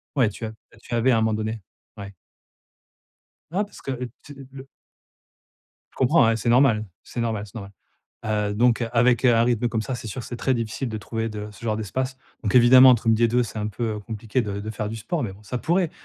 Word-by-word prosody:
Ouais, 125 -6 +3
tu 105 +2 -7
a 110 - -6 0.3
tu 120 - -9
avais 120 +2 +3
à 120 - +4
un - - +2
moment 110 0 +1
donné. 110 +1 -3 0.4
Ouais. 100 -1 -8 1.4
Ah 195 +4 +1
parce 205 - -12
que, 135 - -4
heu, 125 -1 -4
tu 145 - -11 0.2
le 135 0 -10 1.3
Je - - -26
comprends, 130 0 +4
ouais, 115 - +3
c'est 115 +2 -1
normal. 120 -3 +4 0.2
C'est - - -7
normal, 110 -3 -2
c'est 100 - -17
normal. 100 -3 -7 0.5
Heu, 105 -1 -1
donc, 120 +2 +3
avec 120 +1 +3
un 115 -2 +5
rythme 120 0 +1
comme 110 -2 -2
ça, 130 - -4
c'est 115 - -8
sûr 110 +4 -5
que - - -10
c'est 120 - -5
très 130 +2 +1
difficile 115 +2 -3
de 110 - -4
trouver 115 +1 -4
de 105 -1 -6
ce 105 - -16
genre 110 -2 -1
d'espace. 130 +5 -3 0.3
Donc 105 +2 0
évidemment, 125 +2 +8
entre 120 -2 +3
midi 115 +1 +3
et - - +6
14:00, 125 +2 +2
c'est 110 -1 -6
un 105 - -2
peu, 110 +3 -5
heu, - - -5
compliqué 110 +3 -3
de 100 -3 -4
de 105 +2 -6
faire 105 -1 -4
du 115 - -5
sport, 115 +10 -3
mais 100 -5 -4
bon, 100 +2 -17
ça 125 +4 -4
pourrait. 175 +2 +1
115 Hz, 240 wpm, -24 LUFS, 110-125 Hz, 1.4 s, évidemment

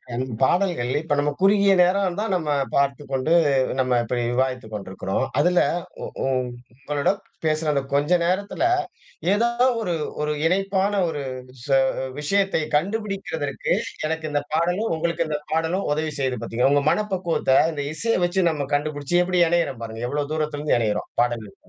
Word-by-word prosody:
இந்த 125 - -1 0.2
பாடல்கள்ல, 170 -6 +2
இப்ப 160 -2 0
நம்ம 145 +1 +2
குறுகிய 200 +1 +5
நேரம் 180 0 +3
தான், 220 -2 -1
நம்ம 160 -4 -1 0.3
பார்த்துக்கொண்டு 140 +1 0 0.5
நம்ம 125 -2 +2
இப்டி 120 +1 -2
விவாதித்துக் 125 -3 -1
கொண்டிருக்கிறோம். 95 +2 -3
அதுல 180 0 +3 0.4
உ - - -3 0.2
உ - - 0 0.6
உங்களோட 145 +2 +1 0.3
பேசுன 155 0 +1
அந்த 140 -2 +1
கொஞ்ச 145 +4 +2
நேரத்துல, 200 - -1 0.7
ஏதோ 230 +3 +3 0.3
ஒரு 180 -6 -1 0.3
ஒரு 150 0 0
இணைப்பான 195 +2 +1 0.2
ஒரு 145 -3 -3 0.3
விஷய 135 +2 +1 0.2
அ - - -3
விஷயத்தை 195 +1 +1
கண்டுபிடிக்குறதற்கு, 195 -6 -2 0.4
எனக்கு 160 0 -3
இந்த 145 0 +1
பாடலும் 175 +7 +1
உங்களுக்கு 170 0 -1
இந்த 150 -1 -1
பாடலும் 165 +4 0
உதவி 155 +1 -1
செய்து 130 -2 0
பாத்தீங்களா? 125 +4 +1
உங்க 145 0 +2
மனப்பக்குவத்த 185 -9 +1 0.2
இந்த 145 -2 -3
இசைய 230 +8 0
வெச்சு 175 0 +2
நம்ம 145 -4 -3
கண்டுபிடிச்சு, 145 +2 -1
எப்டி 180 0 +1
இணையிறோம் 165 -8 0
பாருங்க. 110 0 -7
எவ்ளோ 145 +2 -1
தூரத்துலருந்து 150 -2 0
இணையிறோம், 105 -2 -1
பாடல்கள் 115 -4 -3
155 Hz, 145 wpm, -23 LUFS, 135-180 Hz, 0.7 s, குறுகிய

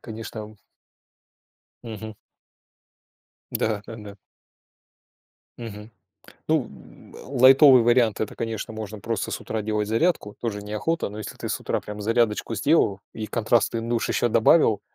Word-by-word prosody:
Конечно, 110 -1 -8
м 105 0 -10 1.3
Мгм. 110 -2 -7 1.4
Да-да-да. 105 -1 -4 1.4
Мгм. 110 -2 -8 0.6
Ну, 155 -4 +2
м, 65 -3 -16
лайтовый 130 0 +7
вариант- 120 -2 +3
это, 110 - -3
конечно, 115 -1 -4
можно 110 -1 -6
просто 115 -1 -3
с - - -4
утра 110 -1 -4
делать 105 -1 -1
зарядку. 115 - 0
Тоже 110 -4 -3
неохота, 105 +11 -2
но 105 +1 -9
если 110 - -7
ты - - -6
с - - -2
утра - - -2
прям 105 0 -8
зарядочку 115 +1 0
сделал 110 - +2
и 110 -1 -5
контрастный 115 +1 +1
душ 115 0 -1
еще 120 - +1
добавил, 115 -1 +4
110 Hz, 130 wpm, -24 LUFS, 105-120 Hz, 1.4 s, лайтовый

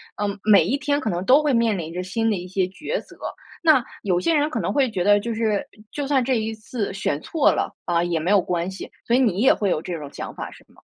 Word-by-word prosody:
嗯 205 -1 -3
每 215 -2 +7
一 275 - 0
天 285 0 0
可 220 - -1
能 175 -1 -2
都 275 +6 +5
会 295 -2 +2
面 230 -3 +2
临 165 -2 -5
着 180 - -3
新 225 +5 -1
的 210 - +1
一 180 0 -7
些 190 +1 0
抉 305 - -4
择， - - -17 0.4
那 310 -7 +5 0.2
有 185 -3 +1
些 185 - +1
人 300 -1 +2
可 - - -2
能 - - -1
会 275 -3 +2
觉 190 -5 -2
得 205 +2 +5
就 230 +3 -3
是 220 -3 0 0.2
就 285 -2 -3
算 270 -2 +2
这 260 +1 +1
一 220 +1 -3
次 215 -1 -4
选 195 -7 -1
错 320 -4 +2
了， - - -2
啊， 170 -1 +1
也 170 -2 -1
没 175 +5 0
有 205 -2 +5
关 175 +1 -2
系， 190 - -8 0.2
所 235 - 0
以 250 - +5
你 215 -7 +2
也 260 - +6
会 205 - -1
有 155 - 0
这 175 0 -5
种 145 -2 -8
想 - - -6
法 - - -6
是 - - -16
吗？ - - -23
210 Hz, 295 characters per minute, -23 LUFS, 180-260 Hz, 0.4 s, 每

